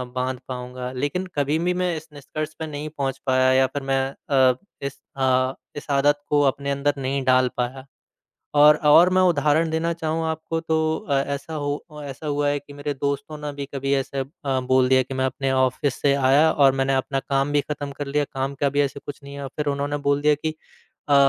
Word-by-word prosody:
बाँध 130 Hz, 0 st, -2 dB
पाऊँगा, 125 Hz, 0 st, -5 dB
लेकिन 145 Hz, +8 st, -2 dB
कभी 145 Hz, +2 st, +1 dB
भी 180 Hz, +2 st, +1 dB
मैं 180 Hz, -1 st, 0 dB
इस 160 Hz, +1 st, -9 dB
निष्कर्ष 155 Hz, +2 st, -6 dB
पे 160 Hz, -, -3 dB
नहीं 150 Hz, 0 st, -5 dB
पहुँच 135 Hz, -1 st, -2 dB
पाया 130 Hz, 0 st, +4 dB
या 130 Hz, 0 st, +4 dB
फिर 145 Hz, +1 st, -5 dB
मैं 135 Hz, 0 st, +1 dB, 0.3 s
अ, 130 Hz, -2 st, +5 dB, 0.3 s
इस 140 Hz, -1 st, -5 dB, 0.2 s
अ, 130 Hz, 0 st, +2 dB, 0.2 s
इस 145 Hz, -, -8 dB
आदत 140 Hz, +1 st, +4 dB
को 145 Hz, -1 st, +3 dB
अपने 140 Hz, +1 st, -1 dB
अंदर 140 Hz, +1 st, +1 dB
नहीं 135 Hz, +1 st, -1 dB
डाल 130 Hz, -1 st, +4 dB
पाया। 125 Hz, +2 st, -3 dB, 0.8 s
और 150 Hz, +1 st, +8 dB
और 170 Hz, +5 st, +7 dB
मैं 185 Hz, 0 st, +4 dB
उदाहरण 160 Hz, -2 st, +3 dB
देना 160 Hz, +1 st, 0 dB
चाहूँ 160 Hz, 0 st, -2 dB
आपको 160 Hz, +1 st, -3 dB
तो 160 Hz, -1 st, 0 dB, 0.3 s
अ, 140 Hz, -, +3 dB, 0.2 s
ऐसा 145 Hz, +3 st, -7 dB
हो 145 Hz, -1 st, -3 dB, 0.2 s
ऐसा 140 Hz, +2 st, -7 dB
हुआ 145 Hz, 0 st, 0 dB
है 145 Hz, -, +1 dB
कि 145 Hz, 0 st, -14 dB
मेरे 145 Hz, 0 st, -3 dB
दोस्तों 140 Hz, +2 st, -3 dB
ने 150 Hz, -1 st, -5 dB
भी 140 Hz, -, -4 dB
कभी 135 Hz, 0 st, -1 dB
ऐसे 135 Hz, 0 st, -2 dB
अ, 135 Hz, -1 st, -3 dB
बोल 130 Hz, 0 st, +3 dB
दिया 130 Hz, 0 st, +5 dB
कि 130 Hz, +1 st, -7 dB
मैं 130 Hz, 0 st, 0 dB
अपने 130 Hz, +1 st, -1 dB
ऑफिस 130 Hz, +1 st, +1 dB
से 140 Hz, -1 st, +4 dB
आया 140 Hz, +3 st, +4 dB
और 140 Hz, -3 st, +5 dB
मैंने 135 Hz, 0 st, +2 dB
अपना 135 Hz, +1 st, -1 dB
काम 135 Hz, +1 st, 0 dB
भी 145 Hz, -, +4 dB
ख़त्म 145 Hz, -1 st, -5 dB
कर 145 Hz, -, -3 dB
लिया 145 Hz, +1 st, +1 dB
काम 135 Hz, +1 st, -2 dB
का 140 Hz, -, +3 dB
भी 145 Hz, +1 st, +1 dB
ऐसा 140 Hz, 0 st, -3 dB
कुछ 145 Hz, -, -7 dB
नहीं 140 Hz, -, -9 dB
है 140 Hz, -, -7 dB
और 135 Hz, -, -4 dB
फिर 150 Hz, -, -2 dB
उन्होंने 145 Hz, +1 st, -2 dB
बोल 140 Hz, 0 st, +3 dB
दिया 150 Hz, 0 st, +5 dB
कि 155 Hz, +2 st, -4 dB, 0.6 s
अ, 145 Hz, -, +5 dB
140 Hz, 220 wpm, -23 LUFS, 135-150 Hz, 0.8 s, और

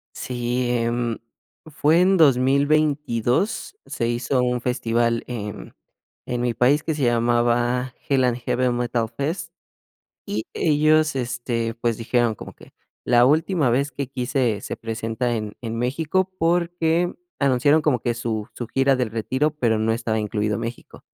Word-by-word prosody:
Sí, 120 Hz, 0 st, -2 dB
em, 120 Hz, -1 st, -1 dB, 0.5 s
fue 160 Hz, +2 st, +2 dB
en 190 Hz, +2 st, +4 dB
2022, 140 Hz, -, +2 dB
se 115 Hz, -, -2 dB
hizo 125 Hz, +2 st, 0 dB
un 125 Hz, 0 st, 0 dB
festival 120 Hz, -1 st, 0 dB
en 105 Hz, -, -6 dB, 0.5 s
en 120 Hz, 0 st, -2 dB
mi 120 Hz, -1 st, +1 dB
país 130 Hz, +6 st, +3 dB
que 160 Hz, -, -2 dB
se 145 Hz, -3 st, -1 dB
llamaba 120 Hz, +1 st, +1 dB
Hell 135 Hz, -2 st, +2 dB
and 120 Hz, -1 st, +2 dB
Heaven 125 Hz, 0 st, 0 dB
Metal 120 Hz, -2 st, -1 dB
Fest. 165 Hz, +4 st, -3 dB, 0.7 s
Y 105 Hz, +2 st, -3 dB
ellos, 155 Hz, 0 st, +3 dB
este, 120 Hz, -2 st, -2 dB
pues, 115 Hz, -1 st, -1 dB
dijeron 115 Hz, -1 st, 0 dB
como -, -, -10 dB
que -, -, -17 dB, 0.3 s
la 120 Hz, 0 st, +5 dB
última 155 Hz, +1 st, +2 dB
vez 140 Hz, +4 st, +1 dB
que 140 Hz, -2 st, -4 dB
Kiss 125 Hz, -1 st, -4 dB
se 115 Hz, -7 st, 0 dB
presenta 115 Hz, +2 st, -2 dB
en 105 Hz, -2 st, -4 dB
en 115 Hz, -2 st, -4 dB
México 155 Hz, +10 st, 0 dB
porque 170 Hz, 0 st, +1 dB, 0.3 s
anunciaron 140 Hz, +3 st, +3 dB
como 145 Hz, -5 st, +2 dB
que 120 Hz, 0 st, -1 dB
su 110 Hz, -2 st, -3 dB
su 120 Hz, -, -5 dB
gira 135 Hz, 0 st, +2 dB
del 125 Hz, -3 st, -1 dB
retiro, 130 Hz, +7 st, 0 dB
pero 115 Hz, -5 st, +2 dB
no 110 Hz, +1 st, +1 dB
estaba 110 Hz, -1 st, -1 dB
incluido 105 Hz, 0 st, -1 dB
México. 115 Hz, +1 st, -7 dB
125 Hz, 145 wpm, -23 LUFS, 115-145 Hz, 0.7 s, la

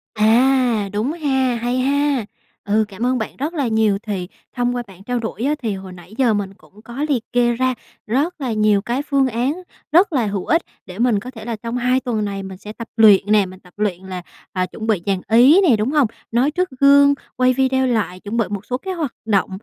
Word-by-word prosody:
À, 230 Hz, -1 st, +3 dB
đúng 220 Hz, +8 st, -1 dB
ha, 265 Hz, -6 st, 0 dB
hay 245 Hz, +2 st, -1 dB
ha! 280 Hz, -2 st, +1 dB, 0.4 s
Ừ, 215 Hz, +1 st, +2 dB
cảm 215 Hz, +4 st, -5 dB
ơn 255 Hz, 0 st, +1 dB
bạn 220 Hz, -, -4 dB
rất 295 Hz, +6 st, -3 dB
là 285 Hz, -6 st, -1 dB
nhiều, 220 Hz, -3 st, +2 dB
thì 195 Hz, -5 st, -4 dB, 0.3 s
thông 245 Hz, 0 st, 0 dB
qua 245 Hz, -, -2 dB
bạn 195 Hz, 0 st, -15 dB
trao 245 Hz, +2 st, -2 dB
đổi 225 Hz, -1 st, -5 dB
á 295 Hz, +2 st, +1 dB
thì 220 Hz, -3 st, -1 dB
hồi 190 Hz, -1 st, -8 dB
nãy 175 Hz, +2 st, -14 dB
giờ 245 Hz, -5 st, +3 dB
mình 200 Hz, -2 st, -2 dB
cũng 205 Hz, +1 st, -20 dB
có 240 Hz, +5 st, -5 dB
liệt 250 Hz, -6 st, +1 dB
kê 240 Hz, -1 st, +3 dB
ra 255 Hz, +1 st, +1 dB, 0.3 s
rất 295 Hz, +8 st, -1 dB
là 250 Hz, -4 st, -1 dB
nhiều 215 Hz, -2 st, +3 dB
cái 240 Hz, +5 st, -2 dB
phương 280 Hz, -2 st, +1 dB
án 245 Hz, +4 st, 0 dB, 0.4 s
rất 350 Hz, +3 st, +4 dB
là 250 Hz, -5 st, +2 dB
hữu 200 Hz, -2 st, -3 dB
ích 330 Hz, +2 st, +2 dB, 0.2 s
để 185 Hz, +4 st, -10 dB
mình 235 Hz, -4 st, +2 dB
có 255 Hz, +5 st, -8 dB
thể 225 Hz, -3 st, -10 dB
là 235 Hz, -2 st, -3 dB
trong 230 Hz, +3 st, -5 dB
2 250 Hz, +1 st, +2 dB
tuần 225 Hz, -5 st, -2 dB
này 195 Hz, -1 st, -4 dB
mình 190 Hz, -1 st, -8 dB
sẽ 210 Hz, +2 st, -9 dB
tập 230 Hz, 0 st, -8 dB
luyện 205 Hz, -2 st, +6 dB
nè, 210 Hz, -2 st, +5 dB
mình 185 Hz, 0 st, -11 dB
tập 180 Hz, -2 st, -20 dB
luyện 205 Hz, -4 st, -1 dB
là, 185 Hz, -1 st, -6 dB, 0.3 s
à, 185 Hz, -1 st, 0 dB
chuẩn 220 Hz, +5 st, -8 dB
bị 210 Hz, -6 st, +1 dB
dàn 195 Hz, -2 st, 0 dB
ý 265 Hz, -, +7 dB
nè, 235 Hz, -, +6 dB
đúng 215 Hz, +5 st, -1 dB
hông? 295 Hz, -6 st, +3 dB, 0.2 s
Nói 250 Hz, +5 st, +2 dB
trước 365 Hz, +2 st, -1 dB
gương, 280 Hz, 0 st, +6 dB, 0.2 s
quay 255 Hz, 0 st, +3 dB
video 265 Hz, 0 st, +1 dB
lại, 200 Hz, -6 st, -1 dB
chuẩn 210 Hz, +4 st, -5 dB
bị 230 Hz, -, +2 dB
một 205 Hz, 0 st, -5 dB
số 250 Hz, -, -2 dB
cái 375 Hz, +7 st, -5 dB
hoạt 310 Hz, -8 st, -3 dB
động, 200 Hz, -4 st, +1 dB
235 Hz, 240 wpm, -20 LUFS, 205-260 Hz, 0.4 s, ý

